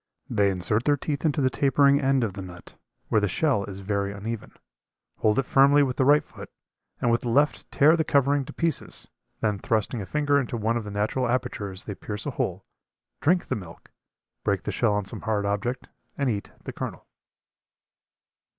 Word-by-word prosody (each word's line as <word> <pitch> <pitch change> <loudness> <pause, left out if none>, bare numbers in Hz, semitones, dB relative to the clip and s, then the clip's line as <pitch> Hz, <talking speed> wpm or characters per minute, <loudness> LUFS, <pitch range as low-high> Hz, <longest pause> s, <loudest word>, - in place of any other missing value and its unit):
They 100 -4 +3
insert 100 +5 0
their 145 -1 +3
teeth 145 +2 -3
into 150 -1 +2
the 130 -1 +2
tapering 140 +1 +4
end 135 -2 +2
of 105 -4 -2
the 95 - -6
nut, 90 -2 -11 0.3
where 110 - +3
the 105 - +2
shell 130 - +1
is 100 -1 -8
very 100 0 -1
uneven, 105 +3 -6 0.7
hold 105 -1 +2
it 135 - +3
firmly 140 +2 +5
with 130 -2 -2
the 130 - +3
right 145 +2 +5
foot, - - -11 0.5
and 120 - +2
with 115 - +2
the 120 - -3
left 145 +5 +2
tear 155 +4 +5
the 160 - +1
covering 140 -1 +2
to 150 - -8
pieces. 165 +1 -2 0.3
Then 105 -3 0
thrusting 110 +2 -1
a 95 - -6
finger 145 -1 +2
into 125 -3 -3
one 115 +1 0
of 115 -2 -2
the - - -5
natural 105 +5 -1
apertures 110 -6 -2
they 105 - -5
pierce 105 +1 -6
a - - -2
hole, - - -3 0.5
drink 175 +4 +2
the - - -2
milk, 90 -5 -10 0.5
break - - 0
the - - -2
shell 105 - +1
on 105 -1 -1
some - - -7
hard 105 -2 -1
object 105 +5 -2 0.3
and 140 -3 +1
eat 100 -2 -4
the - - -6
kernel. - - -6
120 Hz, 195 wpm, -26 LUFS, 105-140 Hz, 0.7 s, firmly